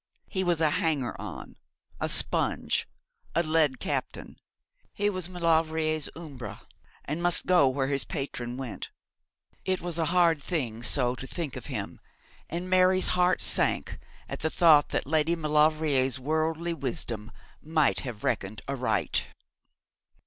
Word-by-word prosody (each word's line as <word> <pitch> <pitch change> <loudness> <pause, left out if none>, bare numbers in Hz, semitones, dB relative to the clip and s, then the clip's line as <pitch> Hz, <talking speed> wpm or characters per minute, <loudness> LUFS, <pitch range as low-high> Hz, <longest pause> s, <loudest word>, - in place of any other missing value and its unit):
He 190 -2 -2
was 175 -3 +1
a 155 -2 +3
hanger 145 -7 0
on, - - -8 0.4
a - - -1
sponge, - - 0 0.5
a 170 - +3
led 155 -4 +2
captain. - - -4 0.6
He 205 0 0
was 185 -2 -1
Maulevrier's 160 -3 +1
Umbra, 145 -7 -8 0.4
and 150 +4 -3
must 175 0 +2
go 175 -7 +5
where 135 +1 -1
his 140 -1 0
patron 125 -2 -5
went. 130 -4 -6 0.7
It 185 -1 0
was 170 -1 -2
a 165 - +2
hard 170 -3 +3
thing 130 -9 -3
so 125 0 +3
to 130 +1 -7
think 155 -2 -4
of - - -7
him, - - -5 0.5
and 175 +3 -4
Mary's 185 0 +4
heart 180 0 +2
sank - - +2 0.3
at - - -6
the 160 - 0
thought 155 -4 +5
that - - -1
Lady 160 +3 +2
Maulevrier's 150 -4 +2
worldly 160 +4 -1
wisdom 120 -6 -3 0.3
might 155 -2 +2
have 120 -6 -7
reckoned 100 +2 -2
aright. 125 - 0
155 Hz, 140 wpm, -28 LUFS, 135-170 Hz, 0.7 s, go